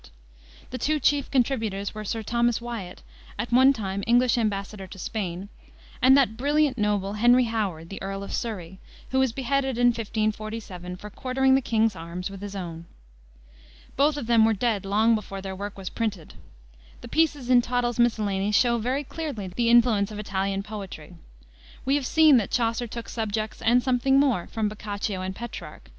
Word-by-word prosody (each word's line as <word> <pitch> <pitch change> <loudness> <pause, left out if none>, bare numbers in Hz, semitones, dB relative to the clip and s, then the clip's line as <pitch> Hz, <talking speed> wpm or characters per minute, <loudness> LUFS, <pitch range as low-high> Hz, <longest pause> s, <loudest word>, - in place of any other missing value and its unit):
The 255 - -4
two 305 +1 +1
chief 290 -1 +2
contributors 225 -7 0
were 215 0 -6
Sir 220 +2 -3
Thomas 235 +1 +1
Wiat, 230 -7 -7 0.3
at 240 - -4
one 260 +3 +6
time 200 -6 -3
English 245 +1 +4
embassador 200 -3 -2
to 190 - -11
Spain, 190 -1 -4 0.5
and 265 +2 +7
that 245 -6 +3
brilliant 290 +1 +2
noble, 205 -3 0
Henry 245 +1 +6
Howard, 200 -8 -3
the 195 - -7
Earl 195 0 -4
of - - -7
Surrey, 190 -5 -4 0.3
who 265 - +2
was 265 -2 +2
beheaded 265 +1 -1
in 245 0 +5
1547 215 -5 -3
for 210 +3 -10
quartering 265 +3 +1
the 270 - +4
king's 225 -3 +1
arms 175 +3 -6
with 195 -1 -9
his 205 0 -6
own. 170 -3 -6 1.1
Both 290 +2 +2
of 285 - -4
them 230 -1 +4
were 225 0 +4
dead 210 -2 -1
long 215 +4 +3
before 205 -3 -3
their 190 0 -6
work 200 +1 -6
was 190 -2 -6
printed. 205 -8 -3 0.7
The - - -9
pieces 295 -6 +1
in 245 -1 +7
Tottel's 240 -1 -1
Miscellany 210 -4 +1
show 235 +2 +3
very 255 +6 -1
clearly 275 - -5
the 230 +6 0
influence 230 -4 +4
of 210 - -8
Italian 195 -1 -2
poetry. 195 -7 -8 0.7
We 270 - +2
have 285 -3 +1
seen 315 -4 +6
that 215 - 0
Chaucer 230 0 0
took 230 +1 -7
subjects 220 -1 -3
and 240 +2 +3
something 265 +1 +3
more 255 -11 +2
from 220 -2 -1
Boccaccio 205 -2 -4
and 190 0 -4
Petrarch. 225 - -8
225 Hz, 175 wpm, -25 LUFS, 195-245 Hz, 1.1 s, and